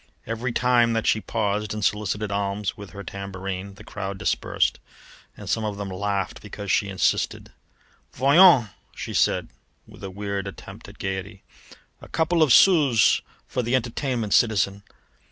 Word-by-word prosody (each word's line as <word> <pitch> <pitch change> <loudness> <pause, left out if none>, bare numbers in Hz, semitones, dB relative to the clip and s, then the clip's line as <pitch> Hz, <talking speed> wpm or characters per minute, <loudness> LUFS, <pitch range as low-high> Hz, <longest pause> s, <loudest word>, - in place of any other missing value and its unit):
Every 115 +3 -3
time 120 -1 +3
that 115 -1 -1
she 110 - +2
paused 105 -1 -2
and 105 -2 -2
solicited 105 0 -1
alms 100 0 -2
with 100 -2 -10
her 100 +3 -9
tambourine 100 0 -6
the - - -13
crowd 100 -1 -6
dispersed, - - 0 0.6
and - - -10
some 110 - 0
of 105 -2 -3
them 100 -1 -5
laughed 100 +1 -2
because 100 -1 -6
she 100 - +1
insisted. 95 -4 -1 0.6
"Voyons," 140 - +6 0.3
she - - -6
said - - +1 0.4
with - - -15
a 95 - -4
weird 100 0 -4
attempt 100 - -10
at - - -15
gaiety, 95 +1 -5 0.6
"a - - -11
couple 165 +1 +1
of 155 -4 +4
sous 145 - +5 0.2
for 125 - -2
the 120 +2 0
entertainment, 120 -2 -1
citizen! 100 -3 +2
105 Hz, 155 wpm, -24 LUFS, 100-115 Hz, 0.6 s, Voyons